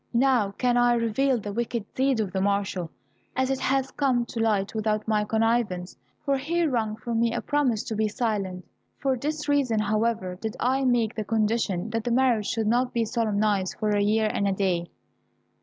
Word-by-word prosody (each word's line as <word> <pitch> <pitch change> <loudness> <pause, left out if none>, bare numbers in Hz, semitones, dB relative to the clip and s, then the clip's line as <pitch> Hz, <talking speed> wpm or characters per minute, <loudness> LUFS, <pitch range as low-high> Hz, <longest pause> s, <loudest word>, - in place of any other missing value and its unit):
Now 250 -5 +3
can 245 -1 +2
I 240 0 +4
reveal 240 +3 +1
the 205 -2 -5
wicked 235 -1 -2
deed 265 -2 +1
of 205 -4 -1
the 190 - -1
marshal, 195 -3 -1 0.5
as 260 0 +1
it 265 - -1
has 270 0 0
come 255 -4 +1
to 235 - -6
light 210 -3 +1
without 215 -1 -1
my 215 -1 +2
connivance, 220 -4 0 0.3
for 280 -1 +2
he 335 +5 0
wrung 225 -7 0
from 225 +1 -3
me 230 0 +1
a - - 0
promise 270 -7 0
to 225 - -4
be 215 +1 +1
silent. 205 -5 -2 0.3
For 270 -1 0
this 300 +4 -3
reason, 280 -6 +2
however, 215 -3 0
did 220 -1 -3
I 265 +2 +1
make 240 -3 +2
the 215 - -3
condition 220 -2 0
that 225 0 -1
the 240 - -2
marriage 240 -4 +2
should 225 -2 -1
not 245 +3 +1
be 230 -1 +1
solemnized 210 -4 0
for 215 -1 0
a 205 0 +2
year 215 +2 +2
and 200 - 0
a 195 - +1
day." 180 -3 -1
225 Hz, 195 wpm, -26 LUFS, 210-250 Hz, 0.5 s, I